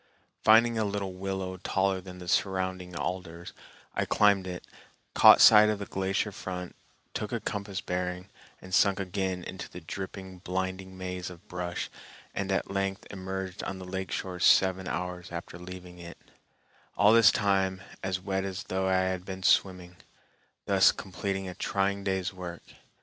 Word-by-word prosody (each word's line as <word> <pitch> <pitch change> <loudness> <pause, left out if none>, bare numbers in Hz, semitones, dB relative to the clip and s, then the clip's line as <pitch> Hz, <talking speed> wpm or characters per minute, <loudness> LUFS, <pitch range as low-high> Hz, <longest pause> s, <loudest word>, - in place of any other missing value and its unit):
Finding 115 +1 +6
a - - +2
little 100 -2 -2
willow 95 0 -4
taller 95 0 0
than 90 0 -10
the 90 -1 -9
surrounding 95 -1 -1
alders, 85 -1 -5 0.4
I - - 0
climbed 100 -2 +3
it, 90 -1 -6 0.5
caught - - +8
sight 105 0 +9
of 105 - 0
the 100 - -5
glacier 95 +2 -1
front, 90 -2 -6 0.4
took - - -4
a - - -1
compass 100 -2 -4
bearing, 90 +1 -3 0.4
and 95 - -10
sunk 100 +1 +4
again 95 -1 -2
into 90 0 -7
the 90 - -9
dripping, 95 +2 -7
blinding 95 +1 -4
maze 90 -1 -4
of 90 +3 -13
brush, 90 -1 -4 0.4
and 100 -1 -2
at 95 - -1
length 95 0 -2
emerged 95 0 -5
on 95 - -4
the 95 - -8
lake 95 0 -4
shore 90 -2 -4
seven 95 +1 +4
hours 90 0 -4
after 85 0 -7
leaving 90 0 -10
it, 85 0 -10 0.8
all 105 +2 +6
this 115 -1 +8
time 95 -2 +1 0.2
as 95 -1 -1
wet 95 0 -2
as 95 -2 -4
though 95 0 -1
I 95 0 +3
had 95 -1 -1
been 95 0 -7
swimming, 90 -2 +2 0.7
thus 95 -1 +5
completing 95 0 -4
a 90 - -5
trying 100 +1 -1
day's 95 -1 -1
work. 90 -2 -7
95 Hz, 160 wpm, -29 LUFS, 90-95 Hz, 0.8 s, sight